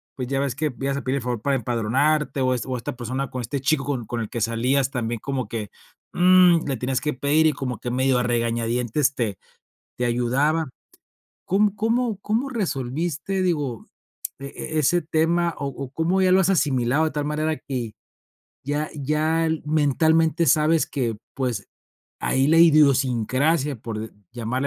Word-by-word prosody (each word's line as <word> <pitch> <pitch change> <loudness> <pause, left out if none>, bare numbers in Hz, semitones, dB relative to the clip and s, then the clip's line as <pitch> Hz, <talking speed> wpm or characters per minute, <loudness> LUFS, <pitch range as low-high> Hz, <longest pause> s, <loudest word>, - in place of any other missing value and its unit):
pues, 125 -2 -4
ya 135 0 0
ves 140 -3 -1
que 150 0 -2
ibas 135 0 -1
a - - -3
pedir 130 +1 0
el - - -3
favor 120 -3 -3
para 140 +2 +1
empadronarte 130 +6 0
o 130 0 +2
es 125 - -3
o 130 -1 -3
esta 120 - -5
persona 130 +3 -3
con 130 - -4
este 130 +4 -3
chico 135 +1 +1
con 135 -5 -2
con 120 +2 -4
el 110 - -5
que 120 - -4
salías 125 +5 +1
también 120 -3 -3
como 135 -3 -3
que 110 -3 -4 0.4
mm, 180 -2 +5
le 135 -2 -1
tienes 125 +2 -1
que 150 0 -1
pedir, 145 +4 +2
y - - +4
como 130 -4 -4
que 120 - -4
medio 130 0 +2
a - - 0
regañadientes 120 +3 0
te 105 -6 -2 0.6
te 125 - +1
ayudaba. 130 +7 +1 0.8
¿Cómo 200 +2 +2
cómo 225 0 0
cómo 230 +7 -1
resolviste, 170 - -2
digo, 145 - -1 0.5
e 135 - -7
e 155 - -3
ese 175 +5 +2
tema, 165 +2 +1
o 140 - -3
o 135 -1 -7
cómo 175 +5 +1
ya 185 - +4
lo 190 - +5
has 190 - +2
asimilado 140 -4 +2
de 160 - 0
tal 145 +1 -2
manera 155 +1 -1
que 120 -5 -5 0.7
ya 145 +2 -2
ya 155 +3 0
el 160 -1 -1
mentalmente 160 +2 +2
sabes 155 +3 +3
que, 120 -6 -2 0.2
pues, 125 -6 -2 0.5
ahí 135 +1 +1
la 160 +2 +4
idiosincrasia, 140 -1 +3
por 110 -1 -6
de 110 +1 -6 0.2
llamarle 120 +3 -2
140 Hz, 180 wpm, -23 LUFS, 125-160 Hz, 0.8 s, mm